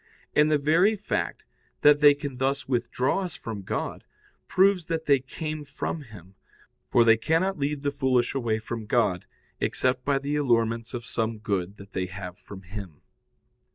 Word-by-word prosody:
And 150 +1 +5
the 155 - +4
very 165 +9 +3
fact 210 +1 -3 0.4
that 145 0 +6
they 145 -1 +7
can 140 -3 -6
thus 135 0 -1
withdraw 125 +4 0
us 180 -4 -5
from 110 -3 -6
God 95 - -4 0.4
proves 190 -3 +3
that 160 -1 -2
they 140 -2 +5
came 155 +3 -5
from 155 +2 -4
Him, 100 - -13 0.6
for 120 - +5
they 115 0 +6
cannot 165 +9 +1
lead 145 0 -2
the 140 - +1
foolish 130 -3 +1
away 120 -5 0
from 110 0 -6
God 100 -6 +1 0.3
except 130 0 0
by 140 0 +2
the 140 +2 -2
allurements 115 -3 +1
of 120 -1 -5
some 115 -1 -2
good 100 -2 -2
that 100 0 -13
they 90 0 -1
have 90 0 -8
from 100 -2 -11
Him. 95 -4 -9
130 Hz, 170 wpm, -26 LUFS, 110-150 Hz, 0.6 s, they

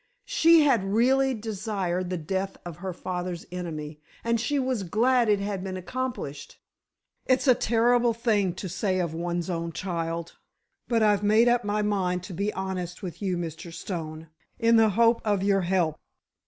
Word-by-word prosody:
She 330 0 +5
had 255 -9 +3
really 265 +3 +3
desired 200 -5 -3
the 180 - -2
death 190 +4 -3
of 170 -3 -7
her 190 +1 -4
father's 180 -1 -4
enemy, 155 -4 -6 0.2
and 235 -1 +1
she 290 +4 0
was 260 -4 0
glad 230 +6 +2
it 205 -1 +3
had 200 -2 -3
been 190 -1 -4
accomplished! 185 - -5 0.7
It's 260 +2 +2
a 255 - +8
terrible 240 +1 +3
thing 210 -6 +1
to 190 - -5
say 185 +1 -1
of 170 -3 -1
one's 170 0 -2
own 170 -2 -3
child, 170 -2 -4 0.5
but 230 -2 +2
I've 210 -1 +3
made 215 +3 +4
up 240 0 +3
my 210 +1 0
mind 185 -3 0
to 185 - -8
be 200 +4 -1
honest 185 -2 -4
with 175 0 -6
you, 185 -3 -1
Mr. 170 0 -6
Stone, 165 -2 -6 0.3
in 230 -1 +4
the 220 -1 +5
hope 230 +3 +3
of 205 -3 +1
your 195 -1 +3
help. 175 -4 0
195 Hz, 170 wpm, -26 LUFS, 175-230 Hz, 0.7 s, a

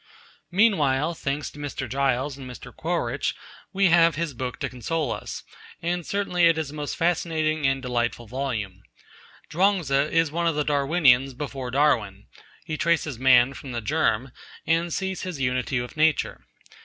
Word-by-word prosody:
Meanwhile, 170 -7 +2
thanks 145 -2 -3
to 145 - -13
Mr. 145 -2 -4
Giles 135 +2 0
and 135 -2 -9
Mr. 125 - -11
Quaritch, - - -1 0.4
we 195 -1 +3
have 165 -1 +5
his 165 -1 -2
book 125 +1 -4
to - - 0
console 130 +3 -2
us, - - -6 0.4
and 175 +1 -2
certainly 180 -2 +1
it 165 -1 +3
is 155 -3 -3
a - - -12
most 150 -1 -4
fascinating 155 -3 +1
and 135 0 0
delightful 120 -1 -1
volume. 110 -6 -4 0.7
Chuang 190 +4 +3
Tzu 135 -2 -3 0.2
is 165 -2 +2
one 170 +2 0
of 165 - +1
the 150 - +1
Darwinians 140 -3 +3
before 135 -2 -5
Darwin. 120 -8 +1 0.4
He 155 -2 -4
traces 155 -7 0
man 130 0 +5
from 135 -2 -8
the 120 - -2
germ, 105 - 0 0.3
and 165 +1 +1
sees 190 +2 -2
his 180 -6 -5
unity 125 0 0
with 120 0 -6
nature. 155 0 +1
145 Hz, 165 wpm, -25 LUFS, 130-165 Hz, 0.7 s, have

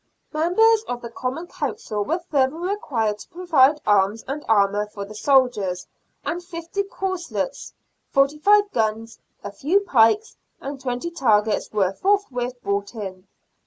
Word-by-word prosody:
Members 420 +8 +4
of 245 0 -4
the 235 - -7
Common 260 +8 -4
Council 220 - -3
were 320 +11 0
further 290 -5 0
required 285 - -2
to - - -12
provide 315 -5 +3
arms 205 +1 +2
and 290 +3 -4
armour 205 -1 +3
for 200 -1 -7
the 210 - -11
soldiers, 215 -7 +2 0.4
and 350 +1 -3
fifty 340 +2 -4
corslets, 390 +5 -4 0.4
forty 275 +2 +2
five 410 +4 +4
guns, 225 0 -2 0.2
a 205 - -5
few 325 - +1
pikes, 360 - +3 0.2
and 275 0 -7
twenty 255 +6 -3
targets 220 -8 +1
were 195 -3 +1
forthwith 255 - 0
brought 200 +3 -2
in. 190 -3 -7
265 Hz, 140 wpm, -23 LUFS, 215-345 Hz, 0.4 s, Members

